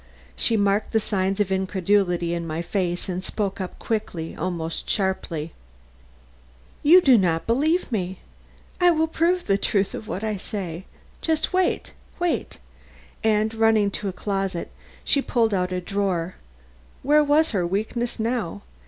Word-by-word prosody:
She 225 - +2
marked 200 +1 +1
the 220 - +4
signs 195 -2 -1
of 200 -2 +1
incredulity 190 -2 +1
in 170 -1 -3
my 160 +2 -3
face 175 0 -2
and 185 0 -3
spoke 200 -1 -3
up 185 - -6
quickly, 180 -7 -3
almost 165 -1 -3
sharply: 170 -5 -1 1.3
"You 345 +5 +7
do 260 -8 +6
not 165 -3 +1
believe 300 +8 +1
me. 190 -4 -2 0.6
I 355 -1 +6
will 320 -2 +3
prove 340 +3 +1
the 195 -1 +2
truth 200 -1 +1
of 215 - -7
what 195 - -4
I 215 -2 -1
say. 185 -3 -5 0.7
Wait 370 0 0 0.2
wait!" 350 -1 -1 0.7
and 215 0 +2
running 220 -2 +3
to 200 0 -2
a - - -5
closet, 195 -3 -3 0.3
she 280 - +3
pulled 230 -5 +1
out 180 -1 0
a 180 - -1
drawer 185 -2 -1 0.7
where 300 +2 +5
was 300 +2 +3
her 180 -5 0
weakness 220 +6 -2
now? 220 - -2
200 Hz, 145 wpm, -24 LUFS, 180-225 Hz, 1.3 s, You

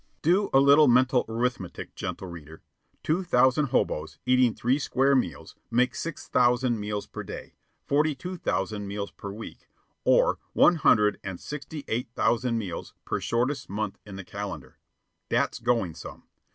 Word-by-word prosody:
Do 185 +6 +3
a 135 - +6
little 140 +2 +6
mental 125 +1 +4
arithmetic, 115 -6 -3
gentle 95 - -5
reader. 80 -2 -11 0.4
Two 160 +4 +1
thousand 130 -3 +3
hoboes, 80 -9 -1
eating 125 -2 +3
three 130 +4 +1
square 135 0 +2
meals, 85 - -2
make 125 +1 +2
six 165 -2 -6
thousand 125 -1 +2
meals 105 0 -3
per - - -7
day, - - -8 0.3
forty 150 +1 +2
two 180 +8 -6
thousand 105 - -2
meals 100 0 -4
per 100 - -8
week, 110 +3 -10 0.4
or - - +3
one 175 - +5
hundred 105 -8 +4
and 95 -2 -5
sixty 150 0 -7
eight 120 +1 -2
thousand 120 0 +1
meals 95 -6 -5
per - - -1
shortest 130 +4 -1
month 105 0 -3
in 100 -2 -10
the 95 - -7
calendar. 90 -11 -7 0.5
That's - - 0
going 115 -8 0
some. - - -10
120 Hz, 155 wpm, -27 LUFS, 100-135 Hz, 0.5 s, a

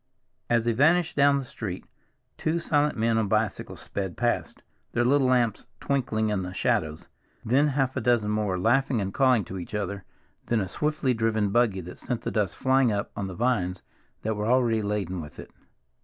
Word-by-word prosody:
As 115 -1 +2
they 120 - +3
vanished 160 +8 +3
down 140 0 +4
the 135 - -3
street, 100 -7 -6 0.5
two 160 +2 -1
silent 150 -4 +1
men 115 0 +2
on 110 - 0
bicycles 110 0 -1
sped 95 -3 -5
past, 120 0 -1 0.3
their 120 - +2
little 135 +1 +3
lamps 120 -4 +1
twinkling 115 -6 0
in 105 -2 0
the 90 0 -6
shadows; 80 -3 -1 0.4
then 135 +6 +3
half 135 -2 0
a 130 - -1
dozen 115 -3 +2
more, 105 -3 0
laughing 120 +5 +2
and 95 -1 -3
calling 130 -5 +3
to 95 +2 -6
each 90 +4 -7
other, 100 -1 -3 0.4
then 120 - +2
a 95 - -2
swiftly 150 +3 0
driven 110 -3 0
buggy 110 -4 +2
that 90 +1 -10
sent 120 -2 -3
the - - -3
dust 105 -5 -1
flying 130 -2 +3
up 100 -1 -2
on 100 - -3
the 95 - -7
vines 100 -7 0 0.4
that 110 0 -1
were 105 +1 -2
already 120 -3 +3
laden 100 -4 -2
with 75 -1 -11
it. - - -10
115 Hz, 190 wpm, -26 LUFS, 100-130 Hz, 0.5 s, down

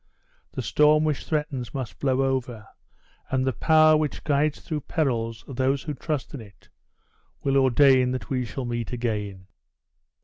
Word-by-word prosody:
The - - -4
storm 150 +1 +4
which 155 -2 -1
threatens 145 -6 -3
must 130 -4 -5
blow 135 -1 +1
over, 125 -5 -2 0.6
and 130 0 0
the 130 - 0
power 155 +3 +5
which 150 -1 -2
guides 150 0 +1
through 155 -2 -4
perils 115 -8 -2
those 135 +1 -1
who 150 - -4
trust 145 +1 -4
in 140 - -6
it, 100 -3 -17 0.7
will 135 0 +1
ordain 130 -1 +4
that 130 0 -4
we 130 -4 -1
shall 125 +2 -5
meet 120 -1 -4
again!" 105 -6 -3
130 Hz, 150 wpm, -25 LUFS, 120-150 Hz, 0.7 s, power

